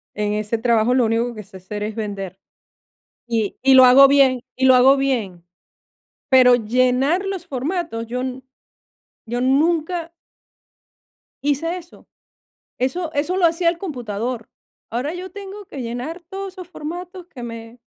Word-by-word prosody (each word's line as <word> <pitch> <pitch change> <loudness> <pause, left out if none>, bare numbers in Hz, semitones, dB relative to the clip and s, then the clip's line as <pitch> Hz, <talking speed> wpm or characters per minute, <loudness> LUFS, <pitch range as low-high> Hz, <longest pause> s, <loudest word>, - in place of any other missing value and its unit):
En 210 0 -1
ese 215 +2 -1
trabajo 230 0 +2
lo 255 -2 +3
único 230 +2 0
que 215 -2 -8
sé 195 0 -13
hacer 195 +3 -7
es 215 0 -4
vender 195 -3 -5 0.9
y 225 -3 -1
y 270 0 +6
lo 260 -1 +9
hago 265 +2 +8
bien 270 -2 +4
y 260 - +1
lo 260 -1 +7
hago 260 +2 +6
bien. 225 -11 -2 0.9
Pero 255 -2 +7
llenar 255 - +1
los 385 -3 -4
formatos, 285 -4 -3
yo 250 +2 -3 1.0
yo 240 +2 -3
nunca 325 +5 +1 1.3
hice 295 +4 0
eso. 345 -1 -14 0.7
Eso 315 +6 -1
eso 305 +6 0
lo 370 -2 +4
hacía 335 +1 +1
el 335 0 0
computador. 240 - -4 0.4
Ahora 255 +8 -2
yo 365 +1 -7
tengo 405 0 -9
que 275 -6 -7
llenar 245 +9 -5
todos 385 0 -6
esos 365 -3 -10
formatos 355 +2 -8
que 245 -8 -9
me 230 0 -9
260 Hz, 145 wpm, -21 LUFS, 230-335 Hz, 1.3 s, lo